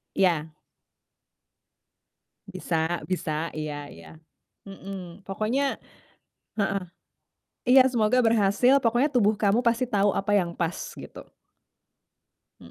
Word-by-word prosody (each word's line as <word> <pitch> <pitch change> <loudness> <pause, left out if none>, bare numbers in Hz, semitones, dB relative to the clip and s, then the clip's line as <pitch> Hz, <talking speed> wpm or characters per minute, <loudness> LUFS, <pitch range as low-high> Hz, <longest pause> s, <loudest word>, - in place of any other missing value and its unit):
Iya. 165 -5 +1 2.0
Bisa 175 -2 -2
bisa, 165 -3 -3
iya 150 -2 -5
iya, 85 -11 -13 0.6
mhm. 195 -1 -9
Pokoknya 230 +8 -1 0.8
heeh, 195 -1 0 0.8
iya 260 +1 +7
semoga 235 0 +2
berhasil, 225 +4 +3
pokoknya 245 +4 +1
tubuh 220 -5 +3
kamu 205 +1 +1
pasti 235 +2 +2
tahu 205 -2 +2
apa 200 +1 -1
yang 170 -2 -2
pas, 170 -1 -4
gitu. - - -11 1.3
Mhm. 85 - -14
195 Hz, 100 wpm, -26 LUFS, 170-230 Hz, 2.0 s, iya